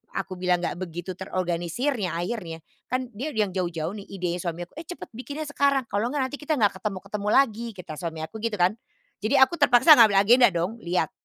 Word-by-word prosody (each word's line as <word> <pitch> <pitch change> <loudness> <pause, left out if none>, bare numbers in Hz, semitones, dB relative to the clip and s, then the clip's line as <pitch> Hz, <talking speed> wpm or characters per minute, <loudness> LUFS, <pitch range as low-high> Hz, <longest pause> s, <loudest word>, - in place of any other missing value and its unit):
aku 185 -1 -4
bilang 180 -1 +1
nggak 175 - -3
begitu 175 0 -5
terorganisir 185 - -2
ya 180 -4 -2
akhirnya, 170 -3 -4 0.2
kan 255 0 -2
dia 235 +8 -5
udah - - -1
yang 200 - -4
jauh-jauh 170 -3 -2
nih 200 -1 -9
idenya 180 -2 -3
suami 170 0 -4
aku, 175 - -14
"Eh 320 - -9
cepet 355 - -8
bikinnya 280 +6 -6
sekarang! 280 -2 +2
Kalau 205 +4 0
nggak 265 -1 -2
nanti 290 - -5
kita 305 +1 -1
nggak 205 -7 +1
ketemu-ketemu 200 +1 -4
lagi," 235 0 +3
kata 175 -5 -8
suami 165 -2 -5
aku 160 - -9
gitu 225 -1 -2
kan. 180 0 +3 0.5
Jadi 215 +3 0
aku 265 +6 +6
terpaksa 260 +1 +7
ngambil 215 -3 +7
agenda 240 +3 +6
dong, 185 +5 -2
lihat, 175 -4 -1
200 Hz, 210 wpm, -25 LUFS, 175-245 Hz, 0.5 s, terpaksa